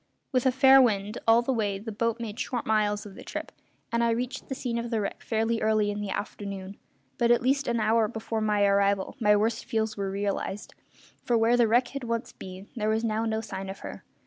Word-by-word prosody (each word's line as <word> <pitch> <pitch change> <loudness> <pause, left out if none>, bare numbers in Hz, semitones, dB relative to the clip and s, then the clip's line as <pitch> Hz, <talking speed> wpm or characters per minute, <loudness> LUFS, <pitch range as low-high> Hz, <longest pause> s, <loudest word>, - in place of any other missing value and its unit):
With 255 -1 +2
a - - +5
fair 265 +1 +7
wind 210 -3 +1
all 230 +1 +6
the 265 - 0
way 205 -4 0
the 220 +3 -7
boat 230 +2 -1
made 225 0 -6
short 245 -2 -2
miles 210 -1 +1
of 205 - -10
the - - -11
trip, - - -6 0.4
and 235 0 +1
I 235 - +3
reached 250 +3 -3
the 265 - -2
scene 235 -2 -2
of 235 0 -4
the 225 -2 0
wreck 200 - -4
fairly 225 0 0
early 215 -1 +2
in 205 0 -4
the 205 - -4
afternoon; 200 -1 -5 0.4
but 235 - +3
at 240 0 +4
least 275 +2 +1
an 235 -1 +1
hour 220 0 +3
before 220 0 -4
my 210 -1 +2
arrival 200 -1 +2
my 210 -2 +4
worst 225 +2 0
fears 220 -1 -1
were 195 -1 -2
realised, 200 +1 -3 0.5
for 240 - +2
where 225 +2 +4
the 240 -2 +4
wreck 240 +3 +3
had 275 -1 -6
once 230 0 -2
been 185 +1 -10
there 215 -2 -1
was 220 +1 +1
now 220 0 0
no 220 0 -1
sign 195 -3 -6
of 195 - -8
her. - - -8
220 Hz, 230 wpm, -27 LUFS, 205-235 Hz, 0.5 s, fair